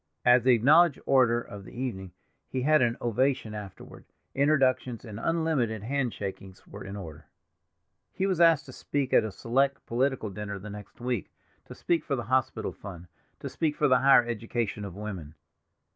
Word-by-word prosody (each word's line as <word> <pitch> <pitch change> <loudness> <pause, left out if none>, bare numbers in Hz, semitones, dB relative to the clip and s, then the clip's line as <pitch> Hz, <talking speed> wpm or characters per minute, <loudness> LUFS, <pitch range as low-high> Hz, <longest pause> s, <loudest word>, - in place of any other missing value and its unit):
As 125 0 +6
the 130 +1 +5
acknowledged 150 +7 +5
orator 125 -3 +4
of 100 -3 -10
the 120 - -11
evening 95 -8 -4 0.4
he 130 -1 -2
had 155 +2 +4
an 120 -1 +1
ovation 120 -1 0
afterward; 105 -3 -10 0.3
introductions 130 -4 +1
and 110 -1 -8
unlimited 145 -10 0
hand 130 0 -1
shakings 95 -1 -7
were - - -10
in 95 +1 -7
order. 80 -6 -9 0.8
He 190 - -2
was 185 -3 0
asked 165 -4 +5
to - - -11
speak 140 -3 -3
at - - +6
a 110 - -4
select 135 +6 0
political 125 -3 -1
dinner 100 0 -5
the 105 +2 -9
next 105 -1 -11
week; 120 -3 -3 0.4
to - - -11
speak 170 -3 0
for 140 - -1
the 120 - -4
hospital 130 +2 0
fund; 90 -3 -10 0.3
to - - -5
speak 155 -2 -1
for 150 - +2
the 130 -2 +4
higher 135 -3 +6
education 115 -2 -3
of 95 -3 -8
woman. 95 -8 -7
120 Hz, 175 wpm, -28 LUFS, 105-135 Hz, 0.8 s, As